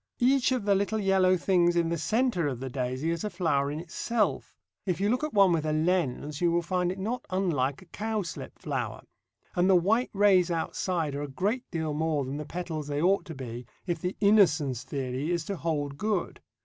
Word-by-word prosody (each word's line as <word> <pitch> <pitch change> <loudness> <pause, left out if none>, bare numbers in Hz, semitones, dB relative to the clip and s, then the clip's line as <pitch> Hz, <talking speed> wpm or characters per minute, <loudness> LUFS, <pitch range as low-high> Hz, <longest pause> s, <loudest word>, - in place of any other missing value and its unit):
Each 260 +1 +3
of 250 -5 0
the 205 - +4
little 200 +3 0
yellow 190 -2 +3
things 175 -1 +3
in 170 -1 +2
the 170 - -1
centre 220 - +1
of 130 -4 -3
the 130 0 -5
daisy 130 +5 -2
is 170 +2 -3
a 210 - -1
flower 165 -7 0
in 150 +2 -4
itself, 210 +7 -1 0.3
if 180 -3 -1
you 200 +1 +1
look 250 +4 0
at 305 - -1
one 195 -2 +6
with 165 -3 +1
a 155 -1 0
lens 155 -3 0
you 175 -1 +3
will 170 0 +1
find 180 0 0
it 185 - -6
not 230 +6 -3
unlike 165 -6 0
a - - -19
cowslip 210 0 -4
flower, - - -4 0.5
and 180 +1 +3
the 190 - +6
white 215 +8 +2
rays 195 -3 +4
outside 165 -1 -1
are 140 - -3
a 145 - -3
great 205 - -2
deal 160 -3 -2
more 155 -2 0
than 135 +2 -4
the 150 - -5
petals 160 -2 -5
they 145 0 -2
ought 190 +5 +2
to 165 - -8
be 120 -2 -7 0.2
if 175 -3 -2
the 180 +4 -3
Innocence 160 - +4
theory 130 +2 -3
is 170 -2 -1
to 200 - -3
hold 145 -4 -2
good. 210 -4 -1
175 Hz, 215 wpm, -28 LUFS, 150-195 Hz, 0.5 s, one